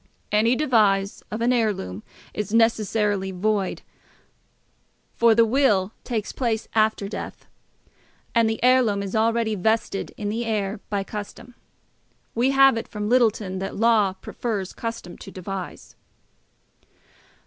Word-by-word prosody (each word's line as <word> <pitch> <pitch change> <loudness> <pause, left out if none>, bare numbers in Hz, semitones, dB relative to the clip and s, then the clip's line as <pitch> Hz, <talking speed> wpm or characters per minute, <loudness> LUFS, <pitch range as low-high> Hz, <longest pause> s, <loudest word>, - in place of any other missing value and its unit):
Any 225 +4 +3
devise 210 -8 +2
of 215 +2 -4
an 245 +2 +3
heirloom 200 - -1 0.3
is 210 -1 -4
necessarily 215 -3 +2
void, 195 +1 -1 1.3
for 230 -1 +4
the 230 0 +5
will 215 -6 +2
takes 225 -4 -3
place 230 -4 -2
after 215 -2 +2
death, 210 - -7 0.9
and 230 -2 +3
the 220 - -2
heirloom 245 -6 +4
is 195 +1 -5
already 225 0 +1
vested 215 0 -1
in 205 -1 -3
the 225 +3 -2
heir 210 -2 -2
by 200 -2 -1
custom. 215 +4 -8 0.8
We 240 +3 +2
have 270 -2 +5
it 225 - -4
from 210 -1 -4
Littleton, 220 -6 +2
that 195 +1 -4
law 215 -3 +3
prefers 195 0 -4
custom 230 -6 -6
to - - -10
devise. 190 0 -7
215 Hz, 125 wpm, -24 LUFS, 200-230 Hz, 1.3 s, the